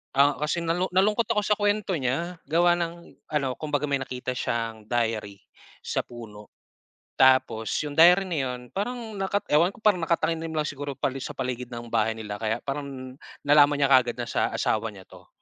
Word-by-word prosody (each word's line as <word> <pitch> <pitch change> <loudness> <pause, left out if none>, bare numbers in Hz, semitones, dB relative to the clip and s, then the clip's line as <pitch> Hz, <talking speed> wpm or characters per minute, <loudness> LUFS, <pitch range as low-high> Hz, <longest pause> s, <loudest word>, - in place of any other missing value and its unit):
Ah, 140 +1 +6
kasi 155 +3 -1
nalu 175 +3 0
nalungkot 210 +4 +3
ako 210 -1 +1
sa 210 0 +1
kuwento 205 0 +1
niya, 165 +7 -2
gawa 170 +4 +4
ng 170 0 -6 0.2
ano, 135 -3 +1
kumbaga 150 -2 -2
may 140 -2 0
nakita 130 -1 -4
siyang 115 -3 -3
diary 110 -4 -1 0.5
sa - - 0
puno, 105 -3 -11 0.7
tapos 130 -4 +4 0.2
yung 145 - -4
diary 180 +3 +8
na 175 -4 -3
yun 125 -1 -4
parang 230 +2 -4
nakat 195 +1 -1
ewan 165 +4 +5
ko - - -18
parang 210 -4 +4
nakatanim 165 0 0
na 155 -1 -1
lang - - -8
siguro 145 -1 -5
pali 135 0 -2
sa - - -6
paligid 125 -1 -3
ng 120 -1 -8
bahay 110 -1 +1
nila 105 -2 -6
kaya 110 +2 -2
parang 135 -2 -6 0.2
nalaman 145 0 +5
niya 140 -1 +2
kaagad 125 -3 +5
na 120 - -3
sa - - 0
asawa 110 +1 0
niya 95 - -12
'to. - - -16
140 Hz, 185 wpm, -26 LUFS, 120-170 Hz, 0.7 s, diary